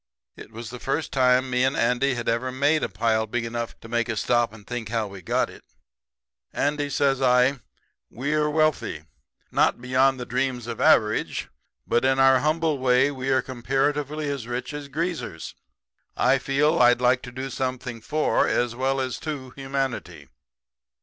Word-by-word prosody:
It - - -12
was 115 +1 -8
the 125 - -8
first 135 +6 -2
time 130 0 +3
me 125 0 +2
and 130 +2 +1
Andy 125 +3 +2
had 120 -1 -5
ever 115 +3 0
made 145 +4 +2
a - - -1
pile 110 -1 0
big 115 +2 -2
enough 115 0 -5
to - - -11
make 120 0 -1
us 115 - -1
stop 120 -2 +2
and 110 -2 -14
think 120 -3 -5
how 115 -1 -1
we 100 -2 -9
got - - 0
it. - - -14 0.9
"'Andy,' 145 0 -1
says 135 -1 +1
I, 125 +1 +3 0.5
'we're 150 +4 0
wealthy 155 - 0 0.5
not - - +2
beyond 130 +1 +2
the 125 - -4
dreams 125 -1 -2
of 115 -1 -5
average; 105 -1 +2 0.4
but 120 - +1
in 130 0 +3
our 135 -1 +5
humble 155 0 0
way 130 +2 +3
we 135 -1 -4
are 130 0 +2
comparatively 140 +4 -1
as 140 -5 -4
rich 125 +4 -4
as 145 -1 -6
Greasers. 165 +4 -4 0.6
I 130 +2 +3
feel 140 +3 +2
as - - +2
if - - +3
I'd 120 0 +5
like 125 0 +3
to 125 - -9
do 130 +2 -5
something 125 -2 -4
for 155 +7 +1
as 120 -1 0
well 135 +2 0
as 130 -2 -3
to 140 -5 -5
humanity.' 135 -2 -4
130 Hz, 180 wpm, -24 LUFS, 120-140 Hz, 0.9 s, our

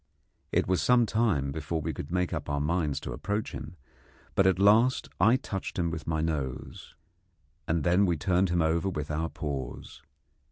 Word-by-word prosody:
It - - +2
was 95 0 +1
some 125 -1 +4
time 105 - +1
before 80 +2 -3
we 80 +1 -3
could 70 - -7
make 90 0 0
up - - -4
our 70 -1 0
minds 75 -1 0
to - - -6
approach 100 - -3
him, - - -7 0.6
but 95 - +4
at 95 - +3
last 110 +6 +4
I 110 +7 +5
touched 100 -7 -4
him 85 -2 0
with 80 -1 -6
my 80 -1 0
nose, 75 -7 -4 0.7
and 80 -2 0
then 90 +4 +3
we 85 -2 +1
turned 90 +4 +2
him 85 -1 +2
over 85 +4 +1
with 75 -4 -4
our 80 +2 -1
paws. 70 -5 -6
85 Hz, 185 wpm, -28 LUFS, 75-95 Hz, 0.7 s, I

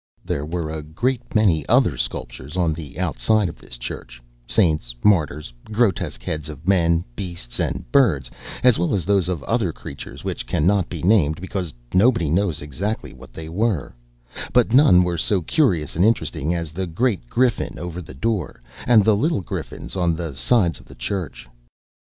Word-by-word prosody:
There 75 +1 -2
were 80 -1 -3
a 80 -1 -4
great 120 - -2
many 95 -8 +4
other - - +4
sculptures - - -5
on 85 -3 +2
the 75 -3 -9
outside 95 +4 +1
of 80 - -10
this - - -9
church,—saints, - - -2
martyrs, 75 -9 +2
grotesque 110 -2 0
heads 75 -1 -3
of 75 +3 -10
men, 85 -3 +3
beasts, 85 -10 -5
and - - -2
birds, - - +3 0.3
as 125 -6 +5
well 90 +4 +1
as 90 -5 -2
those 95 -2 +2
of 85 -6 -2
other 110 -4 0
creatures 70 - -9
which - - -4
cannot 90 +3 +2
be 85 -3 -6
named, 85 -6 +3
because 95 -2 -4 0.2
nobody 95 - +3
knows 85 -4 0
exactly 95 +10 -4
what 65 0 -14
they 80 -1 -8
were; 95 - -1 0.6
but 120 -2 +3
none 125 -10 +7
were 85 -2 -1
so 95 +1 +1
curious 85 - +1
and 85 - +2
interesting 100 -8 +1
as 85 -2 -4
the 95 +3 -3
great 95 - -1
griffin 125 - +1
over 85 +3 -5
the 70 -5 -11
door, 95 +1 -2 0.3
and 115 -3 +6
the 110 -1 +5
little 145 - +1
griffins 90 - -6
on 85 -3 +1
the 80 -3 -4
sides 90 - +2
of - - -18
the - - -13
church. 80 -11 -4
85 Hz, 170 wpm, -22 LUFS, 75-105 Hz, 0.6 s, none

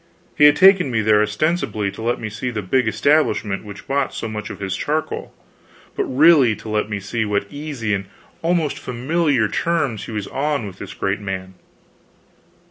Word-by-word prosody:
He 145 - +6
had 145 0 +7
taken 190 -3 +6
me 115 -3 0
there 105 -1 +4
ostensibly 105 - 0
to 110 - -10
let 120 +2 -1
me 110 - -4
see 110 +4 -4
the 110 -4 -4
big 125 +6 +1
establishment 130 -6 +1
which 100 -2 -10
bought 140 -1 -1
so - - -4
much 105 -1 -5
of - - -8
his 95 -1 -3
charcoal, 155 +8 -3 0.6
but - - 0
really 140 -4 +5
to 110 - -10
let 105 0 -1
me 105 -1 -3
see 110 +4 -2
what 105 -1 -1
easy 145 -7 -3
and 100 -1 -2 0.4
almost 165 -3 0
familiar 135 -1 0
terms 150 -6 -1
he - - -8
was 105 -2 -3
on 145 -1 -2
with 95 -2 -9
this - - -8
great 95 +1 -1
man. 95 -2 -5
115 Hz, 185 wpm, -20 LUFS, 105-145 Hz, 0.6 s, had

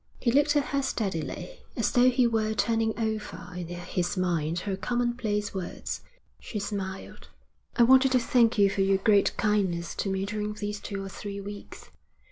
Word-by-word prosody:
He 235 - +1
looked 290 +3 +3
at 290 - +4
her 280 0 0
steadily, 185 - -3 0.2
as 230 - +1
though 250 +1 +5
he 250 0 +3
were 220 -2 +1
turning 225 0 +1
over 220 -5 -4
in 180 -2 -5
his 175 +1 -3
mind 170 -2 0
her 195 0 -2
commonplace 235 0 -1
words. 190 -3 -5 0.4
She 215 - -6
smiled. 195 -2 -5 0.5
'I 240 - +5
wanted 260 +2 +6
to 255 - +5
thank 235 -1 +3
you 200 -1 +6
for 195 0 -1
your 195 0 +3
great 200 +1 +3
kindness 190 -5 0
to 195 - -1
me 190 0 -1
during 210 +1 -3
these 205 0 -4
two 200 -1 -5
or 195 - -6
three 200 +1 -6
weeks. 200 +1 -9
205 Hz, 175 wpm, -28 LUFS, 190-230 Hz, 0.5 s, wanted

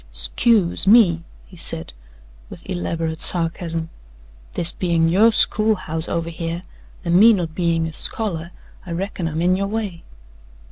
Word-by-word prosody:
"'Scuse 180 - +2
me," 195 -7 +5 0.2
he 185 - -17
said 165 - -4 0.6
with - - -13
elaborate 160 - -4
sarcasm. 165 -1 +1 0.6
"This 170 - +3
bein' 165 -2 0
yo' 205 +7 +4
school 220 -1 +3
house 160 -3 -4
over 170 0 -3
hyeh, 165 +1 -5 0.4
an' 175 +1 +3
me 225 +2 +7
not 170 -5 -3
bein' 165 -1 0
a 160 - -6
scholar, 170 -4 -1 0.3
I 175 -2 -7
reckon 185 -1 -4
I'm 160 +1 -3
in 180 +1 +2
your 200 +1 -2
way." 205 -5 -4
170 Hz, 145 wpm, -20 LUFS, 165-195 Hz, 0.6 s, me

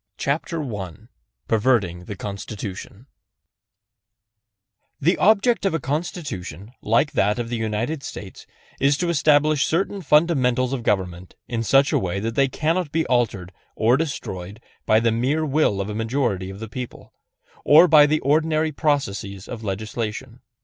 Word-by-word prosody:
CHAPTER 155 +3 -2
I 95 -4 -6 0.5
PERVERTING 105 -7 +1
THE 105 - -6
CONSTITUTION 100 +2 -7 1.9
THE 170 +6 +2
object 220 +3 +3
of 195 -5 +1
a - - 0
Constitution 135 - -5
like 115 +7 +2
that 105 +3 +1
of 120 -1 -3
the 120 - -2
United 115 +7 -2
States 100 -7 -9 0.3
is 140 +1 +3
to 175 +1 -1
establish 150 -2 +3
certain 195 +4 -1
fundamentals 135 -6 +2
of 130 - -2
government 90 -4 -2
in 115 -2 -2
such 135 +5 +3
a - - +3
way 95 +1 -2
that 115 +3 -3
they 135 +2 +3
cannot 160 +4 -1
be 160 +1 0
altered 105 -8 0 0.2
or 115 +3 +3
destroyed 105 - -4 0.3
by 110 - +5
the 115 0 +1
mere 135 +8 0
will 140 -9 +1
of 100 - -2
a 105 - -4
majority 115 -4 -1
of 95 +1 -9
the 110 - -6
people, 125 +3 -8 0.5
or 160 +5 +7
by 150 -3 +7
the 155 +1 +1
ordinary 155 +2 +1
processes 105 - -2
of 115 -2 -7
legislation. 110 +4 -5
125 Hz, 150 wpm, -22 LUFS, 105-150 Hz, 1.9 s, or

